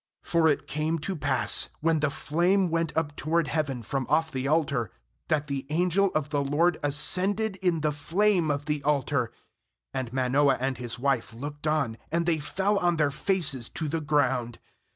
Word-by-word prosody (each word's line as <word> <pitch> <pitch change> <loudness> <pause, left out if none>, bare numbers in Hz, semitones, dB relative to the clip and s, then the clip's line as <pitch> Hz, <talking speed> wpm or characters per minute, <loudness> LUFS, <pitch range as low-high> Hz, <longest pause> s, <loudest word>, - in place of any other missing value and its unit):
20For 165 -2 +3
it - - -2
came 155 +2 -1
to 185 +5 -3
pass, 145 -5 +1
when 165 0 +2
the 150 -1 +1
flame 175 +6 +1
went 165 -1 0
up 150 -2 -1
toward 165 +1 0
heaven 140 -4 -2
from 135 +3 -2
off 160 +2 +2
the 130 0 -2
altar, 140 - +1 0.4
that 150 -1 +1
the 135 -2 -4
angel 180 +5 +2
of 155 -1 0
the 145 -2 0
LORD 160 +5 +2
ascended 185 +8 +1
in 180 -4 0
the 150 0 +1
flame 175 +3 +1
of 145 0 -1
the 150 -1 -1
altar; 140 -4 0 0.6
and 130 -3 -3
Manoah 135 +2 +2
and 130 -1 -2
his 120 -2 -4
wife 125 -3 -1
looked 145 +4 -6
on; 140 -7 0
and 170 +1 +1
they 165 -2 +1
fell 195 +7 0
on 175 -2 +2
their 150 -3 +2
faces 145 - 0
to 160 - -4
the 160 +2 -2
ground. 130 -5 0
150 Hz, 180 wpm, -27 LUFS, 140-165 Hz, 0.6 s, 20For